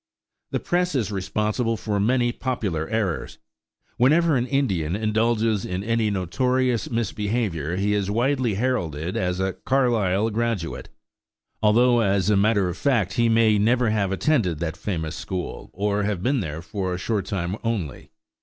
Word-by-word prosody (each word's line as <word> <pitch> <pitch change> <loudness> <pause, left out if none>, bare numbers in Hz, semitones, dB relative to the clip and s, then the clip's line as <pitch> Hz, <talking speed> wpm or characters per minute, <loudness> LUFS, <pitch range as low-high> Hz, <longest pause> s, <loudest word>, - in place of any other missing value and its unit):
The - - -1
press 180 -1 0
is 110 -6 0
responsible 105 +4 -1
for 105 -2 -2
many 120 +3 +2
popular 100 -12 -3
errors. 100 -10 -2 0.6
Whenever 155 +5 +4
an 125 0 0
Indian 95 - 0
indulges 110 0 +1
in 90 +2 -3
any 115 0 +1
notorious 120 +5 0
misbehavior, 105 -7 -1
he 100 +2 +1
is 100 -1 0
widely 120 0 +1
heralded 90 - -1
as 90 0 -1
a 95 0 0
"Carlisle 115 -6 +1
graduate," 110 -6 -2 0.7
although 120 +3 +4
as 100 -2 +2
a - - +4
matter 100 -1 +3
of 90 +1 -4
fact 110 -4 +1
he 115 -1 +2
may 110 -2 +4
never 120 +2 +2
have 100 -3 0
attended 95 - +1
that 80 0 -3
famous 80 -6 -3
school, 90 -2 -5
or 100 +2 -1
have 100 -3 -2
been 135 +3 +2
there 80 -4 -4
for 90 +1 -3
a - - -4
short 100 0 -2
time 95 -2 -2
only. 100 - -3
105 Hz, 155 wpm, -24 LUFS, 95-120 Hz, 0.7 s, Whenever